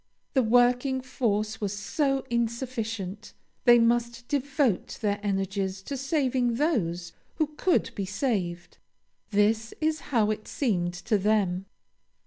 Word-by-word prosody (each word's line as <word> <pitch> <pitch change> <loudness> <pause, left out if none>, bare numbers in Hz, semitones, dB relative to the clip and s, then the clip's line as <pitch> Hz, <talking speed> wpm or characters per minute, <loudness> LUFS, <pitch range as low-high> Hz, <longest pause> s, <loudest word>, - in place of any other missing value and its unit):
The 265 - +4
working 245 +3 +3
force 220 -5 -1
was 205 -1 -2
so 270 +6 0
insufficient, 225 -4 -3 0.3
they 240 -1 +8
must 235 +1 +1
devote 280 - 0
their 205 -2 0
energies 195 -1 -2
to 280 - -4
saving 260 -3 +1
those 180 - 0 0.2
who 305 -1 -1
could 365 +3 +1
be 200 - -3
saved; 190 -6 -2 0.5
this 220 +2 +1
is 310 0 +1
how 220 -5 +3
it 215 0 -5
seemed 180 -10 0
to 210 +4 0
them. 195 -2 +1
225 Hz, 120 wpm, -27 LUFS, 200-260 Hz, 0.5 s, they